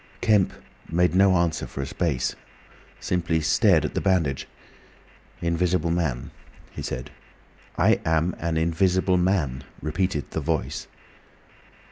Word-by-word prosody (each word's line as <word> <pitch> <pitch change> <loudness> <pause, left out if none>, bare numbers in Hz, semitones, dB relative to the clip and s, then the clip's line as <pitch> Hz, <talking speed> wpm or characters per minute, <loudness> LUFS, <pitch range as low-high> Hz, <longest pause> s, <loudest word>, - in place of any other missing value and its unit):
Kemp 105 -4 +3 0.4
made 90 +1 +2
no 95 0 +5
answer 85 -2 0
for 70 - -5
a - - -3
space, 70 -3 -1 0.7
simply 85 -2 0
stared 80 - +3
at - - -3
the - - -1
bandage. 80 -9 +1 0.9
"Invisible 85 0 +1
Man," 80 -8 -1 0.4
he - - -7
said. 65 +3 -5 0.7
"I - - +3
am 80 +2 +1
an 85 -1 -1
Invisible 90 +3 +2
Man," 85 -8 0 0.2
repeated 80 -1 -2
the 80 - -2
Voice. 80 +1 -2
85 Hz, 120 wpm, -25 LUFS, 80-90 Hz, 0.9 s, no